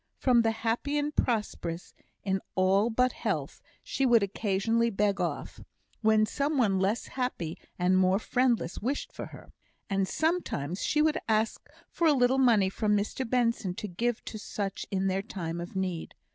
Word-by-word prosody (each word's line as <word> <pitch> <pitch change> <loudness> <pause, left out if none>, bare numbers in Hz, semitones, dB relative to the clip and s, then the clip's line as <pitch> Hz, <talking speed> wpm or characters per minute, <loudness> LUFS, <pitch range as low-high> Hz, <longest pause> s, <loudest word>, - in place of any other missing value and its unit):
From 245 -3 +4
the 225 - +2
happy 230 +6 -1
and 295 0 -1
prosperous 205 -7 -2 0.3
in 190 -1 0
all 195 +4 +3
but 250 +2 +2
health, - - -3 0.2
she 270 - -2
would 240 -5 +5
occasionally 210 +3 +1
beg 200 -1 0
off, - - -3 0.4
when 215 -1 +4
some 285 +6 -1
one 200 -7 +3
less 200 +5 0
happy 250 -11 -3 0.2
and 185 +1 +3
more 185 +1 +4
friendless 240 -5 0
wished 285 - -3
for - - -6
her; - - -13 0.4
and 195 -1 +1
sometimes 245 - -1
she 300 0 +2
would 315 0 +2
ask 220 0 0 0.2
for 335 - +1
a 305 - +6
little 260 0 +3
money 230 -7 +5
from 210 0 +1
Mr 225 +4 -3
Benson 230 -7 +1
to 210 - -5
give 230 +6 -2
to 215 - -6
such 200 -2 -4
in 190 -1 -1
their 190 0 +1
time 170 -5 -5
of 175 +2 -8
need. 185 -3 -3
215 Hz, 170 wpm, -29 LUFS, 190-250 Hz, 0.4 s, a